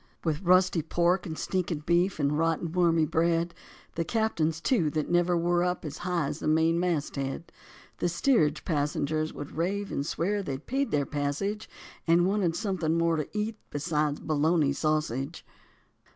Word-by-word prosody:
With 155 -2 -1
rusty 185 -1 +4
pork 175 +3 +1
and 160 -1 -5
stinking 170 -5 -2
beef 175 +2 +2
and 140 +1 +1
rotten, 165 +1 0
wormy 165 -2 +3
bread! 170 +2 +1 0.4
The 165 - -1
captains, 165 -6 0
too, 170 - +2
that 155 +2 -2
never 175 0 +3
were 175 +1 +2
up 180 -1 -1
as 150 0 -6
high 175 -3 -1
as 145 +3 -4
the - - -3
main 160 +2 +3
mast 170 -5 -1
head! 135 +4 -4 0.5
The 175 - +1
steerage 170 - +2
passengers 155 0 -1
would 145 - -8
rave 195 +5 -1
and 140 - -1
swear 190 +7 -1
that - - -9
they'd 135 +2 -6
paid 275 +2 -1
their 145 -1 +1
passage 150 +10 -2 0.4
And 170 +1 +5
wanted 190 -4 +1
something 175 -6 -1
more 165 0 +2
to 150 - -3
eat 215 +1 -2
beside 150 -1 -1
bologna 155 -1 +2
sausage. 150 -1 -1
165 Hz, 165 wpm, -28 LUFS, 155-180 Hz, 0.5 s, And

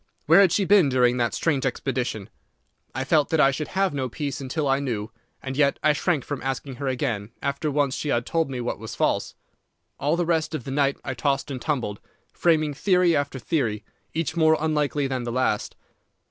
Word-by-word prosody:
Where 165 +6 +7
had 190 -4 +5
she 195 +2 +2
been 190 -6 +5
during 125 -1 +3
that 120 -1 0
strange 145 -5 0
expedition? 125 -5 -2 0.6
I 130 - -1
felt 150 +1 +2
that 160 - +1
I 135 -2 +6
should 150 +2 -4
have 190 -3 0
no 130 -3 -2
peace 140 +2 -4
until 140 +3 -2
I 135 0 +2
knew, 115 -6 -3 0.3
and 130 0 -4
yet 140 -1 +3
I 150 - +5
shrank 155 -2 0
from 145 -2 -4
asking 135 0 -4
her 140 +1 -4
again 120 -5 -2
after 140 +3 -2
once 145 -2 +1
she 150 - -3
had 120 -3 +1
told 165 -4 0
me 130 -2 -4
what 120 - -3
was 110 0 -7
false. - - 0 0.6
All 150 +3 +1
the 175 0 0
rest 160 -1 0
of 130 - -4
the 135 - -6
night 140 0 +1
I 130 - -2
tossed 135 +2 -1
and 130 -2 -5
tumbled, 120 -9 -2 0.3
framing 155 -3 +2
theory 180 +2 +3
after 140 -1 -1
theory, 115 -6 -1 0.3
each 160 -1 -2
more 160 -1 +4
unlikely 150 -2 0
than 130 -2 -2
the 120 - -3
last. 125 -4 0
140 Hz, 205 wpm, -24 LUFS, 130-155 Hz, 0.6 s, Where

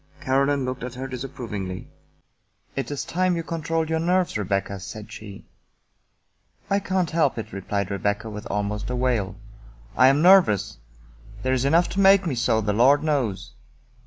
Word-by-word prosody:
Caroline 140 +1 +1
looked 130 -1 -4
at 125 0 -6
her 130 +1 -5
disapprovingly. 120 -8 -6 0.4
" - - -42
It 135 - -3
is 145 -2 -4
time 185 +1 0
you 165 - -3
controlled 165 0 -2
your 160 0 0
nerves, 180 +2 +1
Rebecca," 100 -1 -2
said 110 +3 -9
she. 105 -3 -10 0.6
" - - -40
I 200 - +3
can't 185 -3 -1
help 160 -6 +1
it," 115 - -6
replied 100 0 -3
Rebecca 100 +3 -1
with 105 -1 -7
almost 105 +1 -2
a 125 - -2
wail. 120 -6 0 0.3
" - - -24
I 130 - +6
am 140 +4 +4
nervous. 175 - +5 0.6
There's 130 0 +1
enough 165 +5 +4
to 190 - -3
make 195 0 +6
me 160 - -1
so, 115 -2 +1
the 105 -1 -1
Lord 135 +7 +4
knows." 120 -10 -1
125 Hz, 170 wpm, -24 LUFS, 105-160 Hz, 0.6 s, I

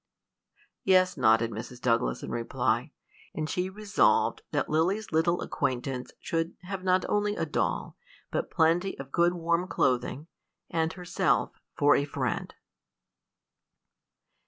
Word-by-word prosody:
'" - - -58 0.3
"Yes," 185 -1 +4
nodded 115 -2 +3
Mrs. 115 +3 -7
Douglas, 115 - +1
in - - -5
reply; 115 -1 -1 0.4
and 155 -1 -2
she 180 +3 -1
resolved 205 +1 +2
that - - 0
Lily's 180 +8 0
little 170 +2 +2
acquaintance 125 0 -2
should 165 0 -2
have 190 0 -5
not 185 -1 +2
only 205 0 +1
a - - -1
doll, - - -2 0.3
but - - -2
plenty 170 +3 +2
of 135 0 -9
good 170 +3 +3
warm 170 +1 0
clothing, 130 0 0 0.5
and 160 -1 +1
herself 180 -1 0 0.3
for 145 0 +5
a - - +2
friend. 145 - -3
165 Hz, 130 wpm, -28 LUFS, 130-185 Hz, 0.5 s, for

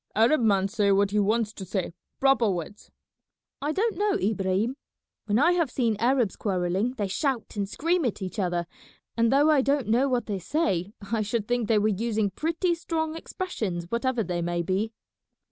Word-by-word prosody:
"Arab 235 +7 +4
man 200 -4 +3
say 200 -1 +1
what 200 0 +3
he 210 - +2
wants 215 +1 +1
to 195 - -8
say, 185 -2 -3 0.3
proper 270 -5 +4
words." 185 +2 -5 0.7
"I 295 +2 0
don't 410 +2 0
know, 415 -1 +2
Ibrahim. 200 +4 0 0.5
When 210 0 +1
I 295 +7 +5
have 340 -5 +1
seen 235 -3 0
Arabs 240 -3 +2
quarrelling 190 +4 -1
they 205 -3 -1
shout 255 +4 -2
and 200 -1 -2
scream 335 +8 0
at 235 - -1
each 190 +2 -5
other, 175 -2 0 0.5
and 230 0 +2
though 290 +3 +5
I 290 -3 +4
don't 275 -1 +1
know 245 +5 +3
what 245 -3 0
they 200 -3 -3
say 195 - -1 0.2
I 225 -2 +1
should 210 0 -2
think 245 -2 0
they 220 - +3
were 210 +1 +3
using 215 0 0
pretty 335 - 0
strong 320 -1 -2
expressions 220 - -4
whatever 240 0 0
they 175 -3 -2
may 175 0 -1
be." 195 +5 -1
220 Hz, 185 wpm, -26 LUFS, 195-270 Hz, 0.7 s, I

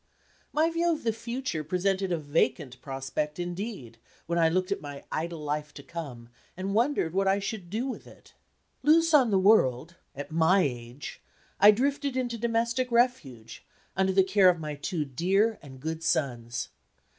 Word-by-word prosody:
My 320 +2 +2
view 340 +1 +1
of 315 - -3
the 225 -1 +1
future 235 -6 -4
presented 185 +3 0
a 170 - +1
vacant 145 -4 -1
prospect 135 +2 -4
indeed, 175 - -5 0.3
when 170 +1 -1
I 165 -1 +4
looked 185 +3 0
at 200 - -1
my 145 -1 -8
idle 165 +2 -3
life 150 0 -3
to 140 - -10
come, 135 -7 -8 0.3
and 190 +1 -3
wondered 230 - +1
what 195 +1 +1
I 195 +1 +3
should 200 -3 -5
do 220 +7 -2
with 265 - -6
it. - - -17 0.5
Loose 325 +3 +4
on 265 -6 +6
the 200 - +3
world 170 - +3 0.2
at 145 +2 -7
my 165 +4 +4
age! 125 -2 -5 0.4
I 205 - +9
drifted 275 +4 +1
into 240 -2 -2
domestic 235 +2 0
refuge, 150 - 0 0.3
under 190 0 +2
the 190 0 +4
care 190 0 +5
of 175 -2 +1
my 150 -1 -4
two 150 +2 -3
dear 195 - +1
and 135 -2 -12
good 160 +3 -4
sons. 120 -7 -1
180 Hz, 170 wpm, -28 LUFS, 150-225 Hz, 0.5 s, I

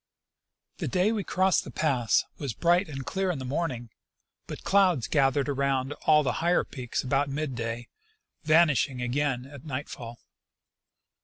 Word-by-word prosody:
The - - -2
day 190 +3 +2
we 215 -3 -1
crossed 185 0 +2
the - - -9
pass 125 -8 +1 0.2
was 135 -7 -4
bright 175 +1 +2
and 135 -3 -6
clear 190 +6 -1
in 175 - -1
the 130 - -6
morn 155 +6 -1
ing, 120 -3 -7 0.6
but - - -8
clouds 185 - +3
gathered 140 -1 +2
around 140 -1 0
all 150 -1 +6
the 135 - +1
higher 175 +2 +3
peaks 125 -4 -4
about 135 +2 +1
mid 145 0 -3
day, 115 0 -4 0.6
vanishing 155 -5 +3
again 125 +1 -1
at 140 0 -12
nightfall. 130 -5 -6
140 Hz, 155 wpm, -27 LUFS, 130-165 Hz, 0.6 s, all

